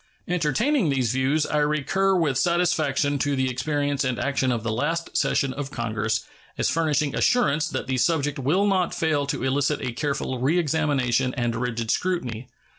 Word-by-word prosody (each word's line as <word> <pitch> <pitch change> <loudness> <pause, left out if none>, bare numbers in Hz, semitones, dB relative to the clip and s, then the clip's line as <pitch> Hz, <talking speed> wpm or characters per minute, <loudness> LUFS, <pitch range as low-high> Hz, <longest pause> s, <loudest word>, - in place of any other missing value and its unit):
Entertaining 180 - +1
these 130 -5 +1
views, 135 +4 +1
I 150 - 0
recur 150 +6 +1
with 160 -7 +1
satisfaction 155 -4 +1
to 145 +1 0
the 130 -1 0
experience 145 +2 -1
and 130 -2 -1
action 135 -2 0
of 115 -3 -2
the 115 - -1
last 165 +9 -2
session 135 -2 +1
of 145 -1 -5
Congress 110 -4 -2 0.3
as - - +1
furnishing 155 -3 +1
assurance 155 -11 +2
that - - -3
the 130 0 -1
subject 150 -1 +1
will 160 +10 +2
not 190 -3 +1
fail 150 -3 0
to 140 - -2
elicit 140 +2 +1
a 125 - -3
careful 135 -1 -2
reexamination 140 -4 +1
and 120 -3 -1
rigid 115 -1 -2
scrutiny. 130 -11 -2
145 Hz, 165 wpm, -24 LUFS, 130-160 Hz, 0.3 s, assurance